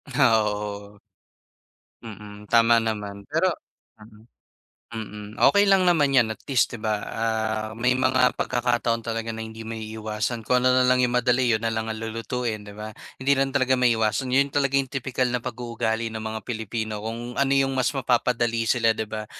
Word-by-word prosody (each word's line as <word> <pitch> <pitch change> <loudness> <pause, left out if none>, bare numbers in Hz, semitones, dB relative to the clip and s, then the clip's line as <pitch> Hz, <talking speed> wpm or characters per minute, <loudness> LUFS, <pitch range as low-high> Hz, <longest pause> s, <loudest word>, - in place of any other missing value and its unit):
Ah, 115 -6 +5
oo. 105 0 -5 1.1
Mm, 105 -1 -10
tama 115 +1 +5
naman. 105 -3 -3
Pero 165 +5 +1 0.5
mm. 105 0 -17 0.7
Mm, 105 -1 -7
okey 205 0 +4
lang 195 -1 +5
naman 155 -6 +3
'yan 125 -4 +4
at - - -7
least, 130 -2 +2
'di 120 - -7
ba, 105 -1 -1
ah, 110 -1 -2
may 125 +2 +1
mga 130 -1 +3
pagkakataon 120 -2 0
talaga 115 0 -3
na 110 - -6
hindi 110 0 -9
maiiwasan 110 0 -4
kung 125 0 +2
ano 130 - +5
na 130 0 +4
lang 125 0 +4
'yong 125 - +1
madali 125 0 +2
'yon 110 +1 0
na 115 - -1
lang 110 0 -3
ang 110 - -5
lulutuin, 115 0 -3
'di 105 - -11
ba? 110 0 -7 0.3
Hindi 135 +2 +3
lang 135 0 +1
talaga 130 -2 +2
maiiwasan, 120 0 +1
'yon 140 +1 +2
talaga 140 -1 +2
'yong 135 -1 0
tipikal 130 -1 -2
na 125 -1 -2
pag-uugali 115 -2 -3
ng 110 - -5
mga 110 0 -4
Pilipino. 110 -2 -4
Kung 115 +2 -5
ano 140 0 +1
'yong 135 0 +2
mas 130 -1 +2
mapapadali 120 -2 +1
sila, 115 -2 +3
'di - - -2
ba? 110 -1 -5
115 Hz, 180 wpm, -24 LUFS, 110-125 Hz, 1.1 s, Ah